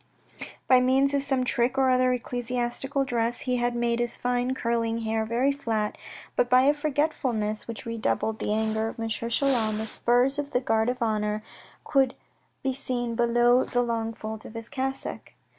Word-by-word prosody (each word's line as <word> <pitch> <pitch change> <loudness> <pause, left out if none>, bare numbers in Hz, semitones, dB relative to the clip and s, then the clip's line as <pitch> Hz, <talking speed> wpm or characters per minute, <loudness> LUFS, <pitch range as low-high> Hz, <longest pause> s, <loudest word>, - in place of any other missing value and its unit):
By 255 -1 +6
means 265 +2 +3
of 280 - +2
some 270 -2 +1
trick 245 +1 +1
or 265 -1 +4
other 255 0 +3
of 250 - 0
ecclesiastical 245 +3 -2
dress, 235 -1 -1
he 250 -1 0
had 240 0 0
made 235 0 0
his 240 0 +1
fine 245 +1 0
curling 230 -1 -1
hair 220 0 -1
very 240 +5 +1
flat, 225 -7 -2 0.4
but 245 - +2
by 255 0 +6
a 285 +2 +5
forgetfulness, 270 -8 -1
which 230 -1 -7
redoubled 220 - -1
the - - -2
anger 220 0 0
of 225 - -7
M. 225 - -2
Chelan, 230 -1 0
the 220 - -3
spurs 245 +5 +2
of 290 0 -4
the 250 - +3
Guard 225 -2 +1
of 250 -1 -2
Honour 215 -1 -1 0.4
could 270 -3 +2 0.5
be 265 0 0
seen 245 -3 -2
below 240 +1 +3
the 245 0 0
long 230 -1 -1
folds 220 0 -6
of 220 - -11
his 230 0 -5
cassock. 270 0 -4
240 Hz, 180 wpm, -26 LUFS, 225-260 Hz, 0.5 s, By